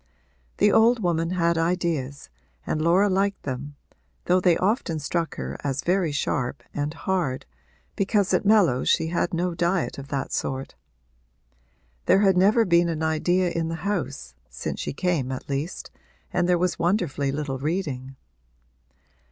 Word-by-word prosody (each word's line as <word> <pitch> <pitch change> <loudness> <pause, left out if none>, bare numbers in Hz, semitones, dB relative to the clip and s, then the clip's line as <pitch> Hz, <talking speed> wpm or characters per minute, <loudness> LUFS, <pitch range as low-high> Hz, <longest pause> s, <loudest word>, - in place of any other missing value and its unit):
The 205 - +4
old 225 0 +4
woman 165 -1 +1
had 170 -2 +1
ideas 165 - -2 0.3
and 155 - -1
Laura 175 +5 +4
liked 195 +1 0
them, 140 +2 -5 0.5
though 180 +1 +4
they 175 -2 +4
often 190 -4 0
struck 165 +3 -2
her 65 +2 -5
as 140 -1 -2
very 180 -3 +1
sharp 140 -2 -2
and 145 +1 -2
hard, 165 -7 -2 0.5
because 200 0 +1
at - - +2
Mellows 200 - +3
she 160 -1 +2
had 170 0 0
no 175 +1 -1
diet 175 -2 -1
of 135 - -8
that 140 -1 -3
sort. 135 0 -3 1.3
There 195 - +5
had 195 -2 +4
never 210 +5 +4
been 170 -1 +3
an 160 -1 -2
idea 175 +3 +1
in 165 -1 -1
the 165 - -3
house, 170 - -3 0.2
since - - -5
she - - -3
came 150 -4 -1
at 130 - -6
least, 145 +5 -4 0.4
and 180 0 +1
there 180 - +4
was 180 0 -1
wonderfully 170 -6 0
little 140 -2 -3
reading. 140 -4 -3
170 Hz, 150 wpm, -25 LUFS, 145-185 Hz, 1.3 s, There